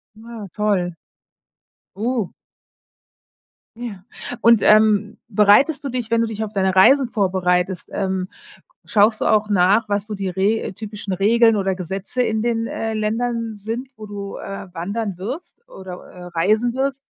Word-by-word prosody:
Ja, 220 -2 -9
toll. 195 -5 0 1.0
Oh. 225 -1 -1 1.4
Ja. 220 -6 -7 0.4
Und, 230 -2 +5
ähm, 215 0 +4
bereitest 220 +8 +4
du - - -1
dich 245 -3 -4
wenn 230 0 +3
du 230 - +2
dich 220 -1 -5
auf 215 - -7
deine 190 -2 +1
Reisen 260 +8 +6
vorbereitest, 185 -4 0
ähm, 190 -2 -2 0.6
schaust 215 +1 +3
du - - 0
auch 215 -1 +2
nach, 205 +3 +3
was 205 0 -1
so 215 - -5
die 195 -2 -3
Re 195 +4 0
typischen 210 -1 -6
Regeln 225 +4 +4
oder 195 -1 0
Gesetze 190 +7 -3
in 220 -2 0
den, 230 -1 0
äh, 225 -1 -3
Ländern 230 +1 -1
sind, 225 +6 -5
wo 215 - -9
du, 200 -1 -6
äh, 195 0 -7
wandern 195 +2 -4
wirst 265 - -7
oder, 190 - -9 0.2
äh, 180 - -12
reisen 215 +8 +1
wirst? 270 0 -1
210 Hz, 150 wpm, -21 LUFS, 195-230 Hz, 1.4 s, Reisen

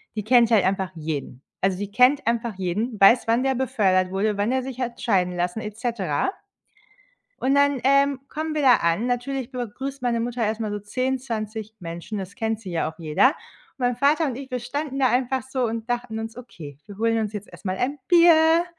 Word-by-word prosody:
die 215 - -3
kennt 235 +1 +5
halt 210 -5 +4
einfach 190 -1 0
jeden. 150 -5 -5 0.2
Also, 190 -1 +1
die 200 +1 -5
kennt 255 +6 +4
einfach 235 -2 0
jeden, 205 +5 -2
weiß, 230 +5 +6
wann 235 +3 +2
der 270 0 +1
befördert 205 -8 +1
wurde, 200 +2 0
wann 205 +4 0
der 260 0 0
sich 260 -1 -7
hat 240 -1 -4
scheiden 180 -5 +1
lassen 180 +4 -1
et 210 -1 -7
cetera. 230 - -1 1.1
Und 270 +2 +1
dann, 285 -1 +3
ähm, 275 0 +4
kommen 310 0 -4
wir 300 - 0
da 255 -3 +7
an. 170 +8 0
Natürlich 250 +1 -2
begrüßt 265 +3 -5
meine 235 -2 0
Mutter 240 +1 -2
erst 215 +1 -1
mal 215 -2 -2
so 205 - -3
10, 255 +6 -2
20 220 -3 -5
Menschen, 170 +5 -6
es 190 +1 -8
kennt 225 -1 -2
sie 195 -5 -8
ja 165 -2 -1
auch 160 - -20
jeder. 170 - +3 0.4
Mein 245 -2 0
Vater 300 +4 +3
und 260 -4 -3
ich, 270 0 -8
wir 250 - -2
standen 275 +3 -4
da 260 -2 +3
einfach 255 +1 0
so 260 0 -2
und 225 +1 -4
dachten 240 -2 -2
uns: 225 +1 -5
„Okay, 160 - -10
wir 205 -2 -11
holen 225 0 +2
uns 215 -2 -2
jetzt 205 0 -6
erst - - -12
mal 185 0 -1
ein 270 +7 -2
Bier,“ 335 -1 +6
230 Hz, 215 wpm, -24 LUFS, 200-260 Hz, 1.1 s, da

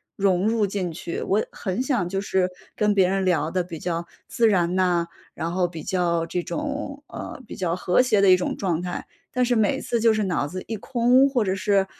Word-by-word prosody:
融 195 0 +2
入 225 -1 +2
进 190 -3 -3
去， 170 +1 -5
我 205 +3 +1
很 190 +5 -3
想 250 -10 0
就 195 +2 -2
是 190 -2 +1 0.3
跟 210 -1 +2
别 190 -2 +4
人 195 0 0
聊 170 -3 +1
得 180 0 0
比 170 -2 -7
较 170 0 -3 0.2
自 235 -2 +3
然 180 -4 +2
呐， 180 -2 +2 0.3
然 165 - -3
后 180 0 +1
比 165 -3 -8
较 170 -3 0
这 175 +1 -2
种 285 - -4
呃， - - -8
比 - - -9
较 175 -3 0
和 185 +4 +3
谐 215 -5 +3
的 195 -1 +6
一 185 - +7
种 180 - -2
状 175 -4 -1
态。 180 0 -4 0.3
但 250 - +2
是 245 0 +1
每 215 -2 +2
次 235 - -1
就 225 0 +4
是 215 -1 0
脑 180 -7 0
子 185 +4 -6
一 225 - -3
空， 250 +4 +3
或 250 -4 +1
者 190 -2 0
是 195 0 +2
190 Hz, 240 characters per minute, -24 LUFS, 180-220 Hz, 0.3 s, 一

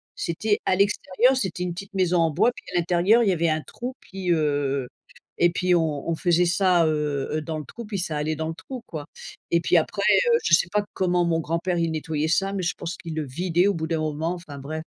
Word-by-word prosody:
C'était 205 +5 -1
à - - +3
l'extérieur, 200 +5 +2
c'était 190 -8 -2
une 180 -1 -2
petite 195 +3 -9
maison 180 -2 +2
en 165 -1 +3
bois, 195 +10 +3
puis - - -12
à - - +4
l'intérieur 180 +7 +3
y 200 - +3
avait 170 -1 +1
un 155 0 0
trou, 250 +9 -7
puis, 185 -2 -4
heu 145 -4 0 0.5
et 175 - +5
puis 180 +1 +1
on 160 -4 0
on 165 - +1
faisait 175 +1 +2
ça, 180 -1 +3
heu, 150 -3 -1
heu - - -2
dans 155 +1 -4
le 150 - -6
trou, 235 - -9
puis 210 -1 -4
ça 175 -4 -2
allait 155 +1 -1
dans 160 +1 -3
le - - -3
trou 250 +8 -8
quoi 150 -3 -7 0.4
et 170 - +3
puis - - +3
après, - - 0 0.3
heu, 465 - +6
je - - +2
sais 170 +1 +5
pas 210 0 +1
comment 180 -1 +1
mon 165 -1 +1
grand-père, 170 +3 -1
il 165 -1 +1
nettoyait 155 -1 -2
ça, 195 +4 +1
mais 195 - -2
je 175 - -1
pense 175 0 -5
qu'il 165 -2 -7
le 155 -1 -2
vidait 175 +6 +1
au 205 - +2
bout 160 -2 -3
d'un 165 -1 -1
moment. 155 +2 -1
Enfin 170 -5 -9
bref 155 +3 -5
170 Hz, 245 wpm, -24 LUFS, 155-185 Hz, 0.5 s, heu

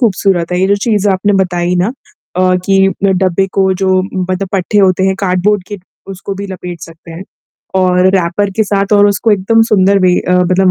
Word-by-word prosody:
ख़ूबसूरत 190 -6 0
है 180 - 0
ये 190 - +2
जो 200 - +2
चीज़ें 210 -3 +1
आपने 200 +2 0
बताई 175 -1 -2
ना। 180 +2 +1 0.5
अ, 185 0 +2
कि 195 0 +3 0.2
डब्बे 190 -1 +1
को 190 -1 +1
जो 190 0 +1
मतलब 185 0 -4
पट्टे 195 +2 0
होते 190 -2 +2
हैं 190 - +1
कार्ड 180 -2 0
बोर्ड 210 -2 +2
के 205 - -6 0.3
उसको 195 +1 -7
भी 200 +1 -6
लपेट 180 -3 -8
सकते 165 +1 -13
हैं। 165 +3 -8 0.5
और 180 0 +2
रैपर 190 +2 0
के 220 - +2
साथ 200 0 -1
और 205 0 +5
उसको 205 +3 0
एकदम 210 +3 +2
सुंदर 200 -3 +2
भी 180 -1 +2
अ, 180 - -2
मतलब 185 +1 +2
190 Hz, 200 wpm, -12 LUFS, 180-200 Hz, 0.5 s, और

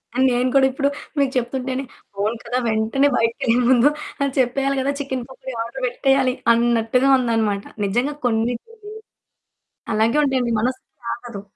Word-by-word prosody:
ఆ! - - -3
నేను 250 +1 +1
కూడా 270 -1 +6
ఇప్పుడు 280 +2 0 0.3
మీకు 275 -2 +2
చెప్తుంటేనే 255 +2 -2 0.3
అవును 215 +3 -1
కదా! 250 - -2
వెంటనే 220 +6 +2
బయటకేళ్ళే 230 +1 +1
ముందు 255 +3 +5 0.3
అని 280 -1 +1
చెప్పేయాలి 270 +2 +1
కదా! 275 - 0
చికెన్ 260 -3 -3
పకోడి 260 0 -8
ఆర్డర్ 260 +3 -8
పెట్టేయాలి 265 +1 +2 0.2
అన్నట్టుగా 235 +2 +2
ఉందన్నమాట. 225 -5 0 0.2
నిజంగా 245 +9 0
కొన్ని 230 0 +1
కొన్ని 430 -2 -12 1.0
అలాగే 225 +6 +2
ఉంటాయాండి 255 -4 0
మనసాగదు. 240 -3 -5
250 Hz, 135 wpm, -21 LUFS, 230-270 Hz, 1.0 s, కూడా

